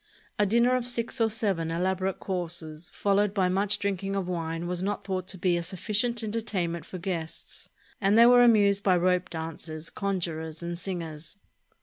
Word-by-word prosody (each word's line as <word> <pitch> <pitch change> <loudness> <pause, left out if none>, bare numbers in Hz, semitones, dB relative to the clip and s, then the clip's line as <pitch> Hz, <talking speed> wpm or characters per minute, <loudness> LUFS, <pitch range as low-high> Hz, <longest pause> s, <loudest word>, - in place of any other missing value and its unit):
A 205 - +4
dinner 235 +4 +3
of 250 -1 -1
six 240 0 -1
or 225 - +4
seven 200 -7 0
elaborate 185 +3 -1
courses 170 -3 -3
followed 205 0 +1
by 185 -2 +2
much 195 +3 +3
drinking 195 0 -2
of 195 -2 -2
wine 165 -1 -3
was 180 0 -1
not 205 +2 -2
thought 185 -2 -3
to 190 - -4
be 175 -1 +1
a - - -1
sufficient 210 +7 -1
entertainment 205 -6 -2
for 185 - -7
guests, 170 -3 -5 0.3
and 200 +2 +3
they 230 - +8
were 245 0 +7
amused 205 -4 +5
by 185 -3 +3
rope 180 0 +1
dancers, 160 -1 -6
conjurers, 165 -5 -3
and 170 0 -4
singers. 170 -2 -5
185 Hz, 170 wpm, -27 LUFS, 170-205 Hz, 0.3 s, they